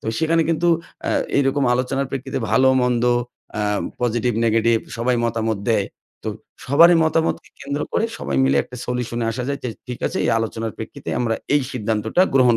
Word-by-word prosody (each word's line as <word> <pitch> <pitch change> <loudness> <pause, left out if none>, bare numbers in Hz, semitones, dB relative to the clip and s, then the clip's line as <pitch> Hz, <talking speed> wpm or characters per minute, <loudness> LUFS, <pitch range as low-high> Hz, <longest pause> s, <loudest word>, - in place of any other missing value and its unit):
তো - - -10
সেখানে 165 +1 +3
কিন্তু 170 +1 +2 0.4
অ্যা - - 0 0.3
এইরকম 140 0 +2
আলোচনার 130 +2 -1
প্রেক্ষিতে 135 -1 -3
ভালো 130 +4 +5
মন্দ, 125 -1 +1 0.5
অ্যা 105 - -1 0.4
পজিটিভ 120 0 +1
নেগেটিভ 115 +1 +3 0.2
সবাই 125 +1 +1
মতামত 110 -2 -1
দেয়। 100 -3 +2 0.4
তো - - -2 0.4
সবারই 165 +6 +7
মতামতকে 160 +1 0
কেন্দ্র 140 +1 -3
করে 225 - +1
সবাই 70 -1 -3
মিলে 65 +1 +3
একটা 125 - -11
সলিউশনে 120 -1 -2
আসা 125 +2 -3
যায়। 140 0 -2
যে - - -1 0.2
ঠিক 125 -1 -5
আছে - - -2
এই - - +2
আলোচনার 115 -1 -3
প্রেক্ষিতে - - -8
আমরা 115 -2 +1 0.2
এই 145 - +3
সিদ্ধান্তটা 110 - +1
গ্রহণ 125 -3 +5
125 Hz, 170 wpm, -21 LUFS, 115-140 Hz, 0.5 s, সবারই